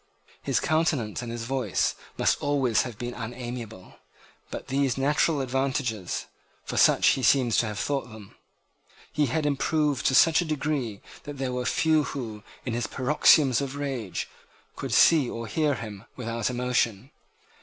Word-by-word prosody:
His - - 0
countenance 155 -9 0
and 120 -1 -6
his 120 -1 -5
voice 125 -5 0 0.2
must - - +1
always 135 -6 +2
have 120 -4 -6
been 120 +1 -5
unamiable. 120 -4 -7 0.5
But - - -7
these 135 -1 +1
natural 145 +2 +2
advantages, 130 -6 -2 0.4
for - - -5
such - - +5
he 135 - +1
seems 125 -3 +3
to 115 - +2
have 105 -1 -5
thought 140 +3 -2
them, 110 -3 -12 0.8
he 150 -1 +2
had 155 +5 -1
improved 145 0 +1
to 130 - +2
such 165 +4 +6
a - - -2
degree 145 -8 -2 0.2
that 145 -1 -7
there 130 -1 -2
were 125 -1 -2
few 155 +2 +2
who, 110 -6 -6 0.2
in 120 - -2
his 120 +1 -1
paroxysms 140 -1 +4
of 140 0 -4
rage, 135 -9 -4 0.5
could - - -5
see 150 -7 +5
or 115 0 -5
hear 150 +5 0
him 105 -5 -8
without 115 -2 -2
emotion. 125 -1 -1
130 Hz, 155 wpm, -26 LUFS, 115-145 Hz, 0.8 s, such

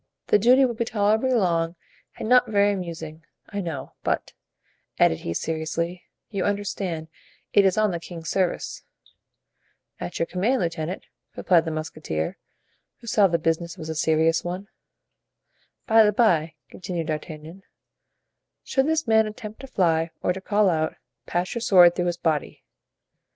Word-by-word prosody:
The 210 - +5
duty 255 +5 +6
will 245 - -1
be 235 - -1
tolerably 220 +3 +1
long 170 -5 +1 0.4
and - - -4
not 250 0 +5
very 205 -1 +3
amusing, 165 -4 -6 0.3
I 200 -1 -3
know; 155 -7 -6
but," - - -1 0.6
added 80 - +3
he, 85 - -4
seriously, 165 - -3 0.3
"you 195 -3 -1
understand, 195 -5 -2 0.5
it 200 - +6
is 190 0 +2
on 215 -2 +3
the 170 - -3
king's 165 -1 -9
service." 185 -3 -1 1.2
"At 90 - -5
your 165 - +1
command, 210 +10 0
lieutenant," 170 +1 -3 0.3
replied 170 -3 +3
the 160 - -2
musketeer, 155 - -4 0.6
who - - -16
saw 210 -3 +4
the 170 -2 +1
business 165 +2 -1
was 160 -2 -7
a 160 - -3
serious 160 +1 +2
one. 185 +4 -5 1.2
"By 225 -1 +6
the 210 - +4
bye," 175 -8 +2 0.2
continued 175 -2 -4
D'Artagnan, 155 +3 -6 1.0
"should 265 +1 +1
this 320 0 +1
man 220 -2 +4
attempt 215 0 -8
to 270 - -9
fly 165 -7 +1
or 180 - +2
to 190 - -7
call 205 +1 +2
out, 160 -3 0 0.3
pass 175 +1 -1
your 235 - -3
sword 180 -6 +7
through 175 - -1
his 175 -1 -1
body." 155 -4 -2
180 Hz, 155 wpm, -24 LUFS, 160-210 Hz, 1.2 s, sword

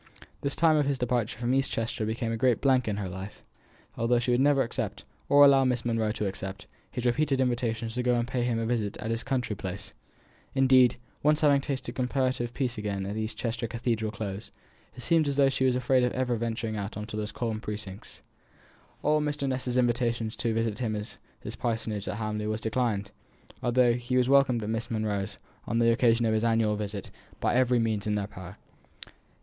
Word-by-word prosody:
The 140 - 0
time 160 +1 +3
of 145 -2 +2
his 140 -1 +1
departure 120 -3 -1
from 120 +1 0
East 135 0 +1
Chester 115 -1 -2
became 115 +1 -2
a - - -1
great 120 0 +2
blank 130 -3 +3
in 105 -2 -1
her 100 -2 -3
life, 95 +2 -8 0.5
although 115 +1 +2
she 120 +1 0
would 120 - +3
never 140 -1 +4
accept, 110 -4 -4 0.3
or 145 0 +8
allow 135 -1 +6
Miss 125 -2 0
Monro 115 -2 +1
to 105 - -3
accept, 95 +1 -5 0.2
his 125 -1 -5
repeated 135 +2 +2
invitations 120 -3 -1
to 125 - -1
go 125 0 +2
and 120 0 0
pay 125 0 -1
him 120 -1 0
a 115 - -1
visit 110 -4 -1
at 110 - -4
his 115 0 -1
country 125 -5 -1
place. 95 +1 -6 0.6
Indeed, 130 -2 +6 0.3
having 150 +1 +4
once 140 -1 +2
tasted 135 -3 -3
comparative 130 -2 -1
peace 125 -4 -2
again 100 -2 -3
in 100 +2 -4
East 110 0 -3
Chester 115 0 -2
Cathedral 115 -1 -1
Close, 100 -1 -5 0.5
it 125 - -8
seemed 165 -3 +3
as 140 - 0
though 140 -1 +5
she 130 0 0
was 130 -1 +3
afraid 125 0 +2
of 125 - +1
ever 125 -1 0
venturing 115 -1 -2
out 100 +1 -4
of 105 - -4
those 105 0 -3
calm 110 -3 -3
precincts. 105 -2 -7 0.8
All 150 0 +3
Mr. 150 -1 -1
Ness's 125 -1 -1
invitations 120 -2 +1
to 115 -2 0
visit 110 -1 -1
him 110 -4 -1
at 105 +1 -6 0.2
his - - -6
parsonage 110 -4 -2
at 95 +2 -3
Hamley 105 -1 -2
were 110 0 -1
declined, 110 -3 -1 0.5
although 120 0 +3
he 120 +1 -1
was 125 -1 +3
welcomed 130 -4 +4
at 105 - -3
Miss 115 0 -2
Monro's, 105 -2 -2 0.3
on 115 - 0
the 115 0 +4
occasion 115 -1 +3
of 110 - +2
his 110 0 +1
annual 115 -2 +2
visit, 105 -2 -5 0.3
by - - +1
every 125 0 +3
means 110 -3 0
in 105 - +1
their 105 -1 -1
power. 95 -1 -10
115 Hz, 205 wpm, -28 LUFS, 110-125 Hz, 0.8 s, or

